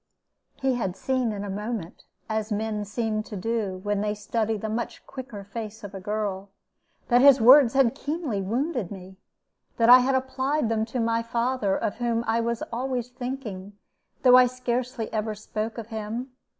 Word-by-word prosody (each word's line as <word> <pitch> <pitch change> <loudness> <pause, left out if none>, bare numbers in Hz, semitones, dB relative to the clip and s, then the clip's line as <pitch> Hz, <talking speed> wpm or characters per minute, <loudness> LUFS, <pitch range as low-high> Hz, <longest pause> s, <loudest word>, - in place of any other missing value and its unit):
He 265 -1 0
had 195 -7 -2
seen 255 -1 0
in 205 -1 -4
a 205 - -5
moment, 210 -3 -5 0.2
as 220 0 -2
men 210 0 -2
seem 215 +1 -1
to 215 - -9
do, 205 -2 -2
when 205 -1 0
they 210 0 -1
study 220 +1 -1
the 220 - -4
much 225 +2 -4
quicker 245 -6 -8
face 215 +2 -7
of 205 -1 -8
a 195 - -6
girl, 200 -1 -3 0.6
that 245 0 +5
his 275 -1 +8
words 255 +2 +7
had 265 -4 +4
keenly 290 - -3
wounded 240 - -1
me 190 -1 -10 0.6
that 230 0 +4
I 250 +1 +11
had 260 +1 +2
applied 260 0 0
them 220 -1 +1
to 235 +3 -4
my 230 0 +1
father, 230 -3 0
of 210 - -2
whom 235 -1 0
I 225 +1 +1
was 235 0 -2
always 250 0 -2
thinking, 245 -6 -6 0.5
though 250 -1 +8
I 250 0 +7
scarcely 250 -2 -2
ever 215 0 -1
spoke 215 +2 -4
of 230 -1 -7
him. 225 +4 -5
230 Hz, 175 wpm, -26 LUFS, 210-250 Hz, 0.6 s, I